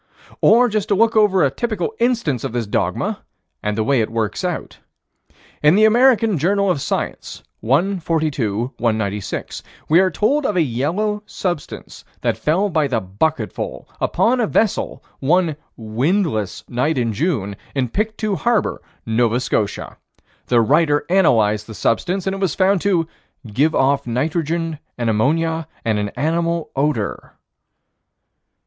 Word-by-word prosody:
Or 245 +3 +6
just 215 -2 -1
to 205 - +2
look 225 +3 +3
over 205 -4 +4
a 140 - +2
typical 215 - -2
instance 230 - 0
of - - -4
this 120 -2 -1
dogma, 105 - -1 0.4
and 105 0 -2
the 110 - +1
way 125 +2 +2
it 110 - -1
works 110 -2 -2
out: - - -4 0.8
In 150 +3 +5
the 215 +2 +5
American 225 - +4
Journal 200 +4 +2
of 145 - -2
Science, - - -4 0.2
1 175 - +1
42 135 -9 -1
196, 110 -4 -2 0.3
we 165 +3 +6
are 190 0 +4
told 250 - +1
of 210 - -1
a 175 - +4
yellow 170 - -1
substance 175 -6 -5 0.2
that - - +1
fell 180 +7 +1
by 155 -6 +1
the 125 -4 0
bucketful 105 +12 -3
upon 250 +2 +2
a 230 - +2
vessel, 220 0 0 0.2
one 165 +2 +2 0.2
"windless" 115 - -1
night 130 +6 0
in 115 -3 0
June, 105 - -1 0.2
in 130 -2 +1
Pictou 215 - -2
Harbor, 235 +1 0 0.2
Nova 115 +1 +1
Scotia. 110 -5 -2 0.5
The 120 -2 +4
writer 145 +4 +2
analyzed 110 - +3
the 110 - -9
substance, 180 - 0
and 190 - 0
it 195 - -5
was 190 -3 0
found 190 -1 +2
to 180 -5 +1 0.4
"give 140 +9 +1
off 140 0 +2
nitrogen 160 +5 -1 0.2
and 120 -2 0
ammonia 160 +8 0 0.2
and 110 -2 +1
an 105 0 -2
animal 165 +3 -1
odor." 135 -6 -2
155 Hz, 145 wpm, -20 LUFS, 120-195 Hz, 0.8 s, Or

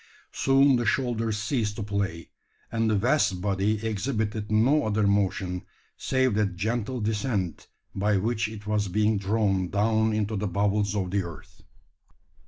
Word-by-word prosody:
Soon 135 0 +4
the 120 - -1
shoulders 115 -4 0
ceased 105 -1 -1
to 105 - -4
play; 100 -5 -3 0.4
and 115 0 +1
the 110 - +2
vast 115 -3 +2
body 100 +3 0
exhibited 110 -1 -2
no 130 +8 +3
other 105 0 +1
motion, 95 -2 0 0.3
save 130 -3 +1
that 100 -3 0
gentle 115 +6 -2
descent 105 -4 -2 0.3
by 100 +1 +1
which 110 +2 0
it 105 -1 -9
was 105 -1 0
being 105 +2 +1
drawn 100 -2 0
down 110 +2 +2
into 110 0 -1
the 105 +1 -1
bowels 100 +2 0
of 95 -3 -2
the 100 0 +1
earth! 85 -3 -10
105 Hz, 150 wpm, -26 LUFS, 100-115 Hz, 0.4 s, Soon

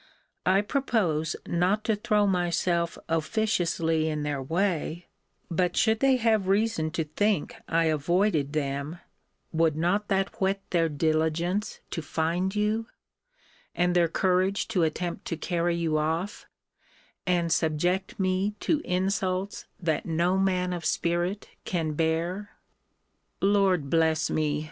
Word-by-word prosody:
I 190 +2 +5
propose 200 - 0
not 185 +5 +1
to 220 -1 +1
throw 210 0 +2
myself 175 -2 0
officiously 165 -2 0
in 150 -1 -2
their 145 -2 -2
way; 170 +2 -1 0.4
but 175 +1 0
should 220 -1 +3
they 270 0 +4
have 220 -5 +2
reason 195 -5 +1
to 160 - 0
think 195 +3 0
I 165 0 +2
avoided 160 0 +1
them, 140 +2 -2 0.5
would 160 -2 +2
not 180 +6 0
that 195 0 -1
whet 195 +1 +2
their 165 -2 +2
diligence 160 +6 0
to 165 - -3
find 170 +5 -1
you, 215 +2 0 0.9
and 180 0 +1
their 175 -1 +4
courage 185 +3 +1
to 200 -6 +1
attempt 170 +2 -2
to 165 - -3
carry 170 +1 0
you 160 -2 0
off, 165 +6 -2 0.8
and 175 -2 +1
subject 175 +6 0
me 190 +2 0
to 310 -2 +1
insults 185 +1 -1
that 165 -2 -1
no 170 +3 +1
man 185 -2 +1
of 175 -1 -4
spirit 175 +5 -1 0.2
can 165 -4 -1
bear? 170 +6 -1 0.9
Lord 195 -6 +3
bless 160 -1 +2
me! 150 -1 0
175 Hz, 130 wpm, -27 LUFS, 160-195 Hz, 0.9 s, I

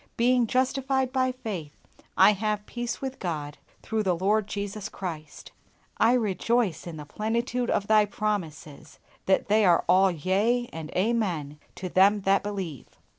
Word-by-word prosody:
Being 245 0 +3
justified 265 +1 0
by 255 -1 +2
faith, 195 - -7 0.4
I 190 +2 +7
have 210 0 -2
peace 240 +1 -5
with 265 0 -5
God 150 -5 -4 0.2
through 220 -1 -1
the 185 -4 +1
Lord 205 +3 +1
Jesus 205 0 -5
Christ. 160 -7 -7 0.5
I 230 +2 +4
rejoice 225 - 0
in 165 -2 -7
the 150 - -8
plenitude 235 +8 -2
of 200 - 0
Thy 215 0 +4
promises, 190 -9 -4 0.3
that 190 - +2
they 215 +1 +3
are 175 -3 +4
all 190 +2 +5
yea 200 +9 0
and 160 -1 -6
amen 180 -9 -1 0.2
to 185 - -5
them 195 +3 +4
that 195 +1 +3
believe. 190 - -6
205 Hz, 150 wpm, -26 LUFS, 180-230 Hz, 0.5 s, I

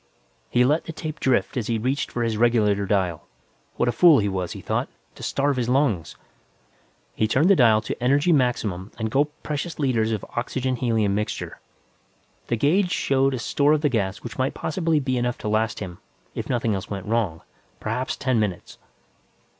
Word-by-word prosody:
He 125 0 +3
let 150 +5 +1
the - - -5
tape 155 0 -6
drift 130 -2 +1
as 120 -5 -2
he 115 - 0
reached 130 +6 -1
for 120 - -2
his 115 -1 0
regulator 105 -3 +2
dial. 90 -5 0 0.5
What 120 - 0
a - - +3
fool 165 +2 +6
he 105 - +1
was, 95 -3 -3
he - - -8
thought, - - -2 0.2
to - - -14
starve 140 -1 0
his 120 -1 -1
lungs. 125 - +1 1.0
He 110 - +1
turned 150 - +3
the - - +7
dial 115 -6 +5
to 120 - -5
emergency 145 +7 +3
maximum 110 - 0
and 110 -1 -3
gulped 145 +3 0
precious 155 +3 -4
liters 120 -6 +1
of 110 -3 -3
oxygen 130 +1 -1
helium 110 -5 +1
mixture. 105 +1 -3 0.9
The - - +1
gauge 175 - +2
showed 135 -4 +1
a - - -3
store 145 +5 +2
of 155 - +1
the 150 - +2
gas 105 -5 -2
which 115 -1 -8
might 130 +1 0
possibly 160 -1 0
be 130 -3 -1
enough 120 0 -1
to - - -6
last 110 +1 0
him, 90 -3 -7 0.3
if - - -5
nothing 115 -3 0
else 95 -1 -4
went 100 -1 -5
wrong; 105 -7 -1 0.4
perhaps 130 +1 -2
ten 130 -3 0
minutes. 100 -5 -3
120 Hz, 190 wpm, -24 LUFS, 105-140 Hz, 1.0 s, the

